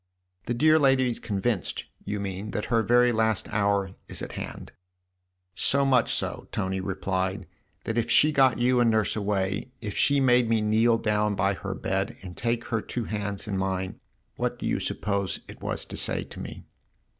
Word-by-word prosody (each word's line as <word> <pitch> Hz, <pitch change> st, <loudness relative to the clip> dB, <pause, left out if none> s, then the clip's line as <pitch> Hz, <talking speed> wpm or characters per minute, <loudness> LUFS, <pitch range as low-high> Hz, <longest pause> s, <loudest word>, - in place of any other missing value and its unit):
"The 120 Hz, -, 0 dB
dear 155 Hz, +5 st, +5 dB
lady 135 Hz, -3 st, +4 dB
is 115 Hz, -, -5 dB
convinced, 105 Hz, -1 st, -2 dB, 0.2 s
you 105 Hz, 0 st, -3 dB
mean, 100 Hz, +1 st, -4 dB
that 105 Hz, -, -2 dB
her 115 Hz, -, +5 dB
very 120 Hz, +1 st, +4 dB
last 110 Hz, -2 st, +1 dB
hour 100 Hz, -2 st, +1 dB, 0.2 s
is -, -, -2 dB
at -, -, -5 dB
hand? -, -, -7 dB, 0.3 s
" 90 Hz, 0 st, -52 dB
" 90 Hz, 0 st, -52 dB
So 140 Hz, +7 st, +2 dB
much 130 Hz, -4 st, +3 dB
so," -, -, -1 dB
Tony 95 Hz, 0 st, -1 dB
replied, 95 Hz, 0 st, -2 dB, 0.2 s
" -, -, -42 dB
that 115 Hz, +1 st, -1 dB
if 115 Hz, -, -2 dB
she 155 Hz, -, +5 dB
got 135 Hz, -5 st, +4 dB
you 125 Hz, +1 st, +3 dB
and 120 Hz, -1 st, +4 dB
Nurse 110 Hz, -2 st, +2 dB
away, 100 Hz, +1 st, -1 dB
if 105 Hz, -3 st, -5 dB
she 140 Hz, 0 st, +3 dB
made 125 Hz, -3 st, +4 dB
me 115 Hz, -1 st, +3 dB
kneel 110 Hz, +2 st, +3 dB
down 105 Hz, -1 st, +1 dB
by 100 Hz, +1 st, +2 dB
her 95 Hz, 0 st, -5 dB
bed 95 Hz, +6 st, -2 dB
and 90 Hz, -2 st, -8 dB
take 120 Hz, 0 st, -1 dB
her 115 Hz, -2 st, 0 dB
two 120 Hz, -, -4 dB
hands 100 Hz, -1 st, -4 dB
in 95 Hz, -2 st, -1 dB
mine, 95 Hz, -1 st, -2 dB, 0.4 s
what -, -, -1 dB
do -, -, -6 dB
you -, -, 0 dB
suppose 100 Hz, -2 st, -2 dB
it -, -, -11 dB
was -, -, -3 dB
to -, -, -8 dB
say -, -, 0 dB
to -, -, -11 dB
me -, -, -7 dB
105 Hz, 200 wpm, -27 LUFS, 95-120 Hz, 0.4 s, dear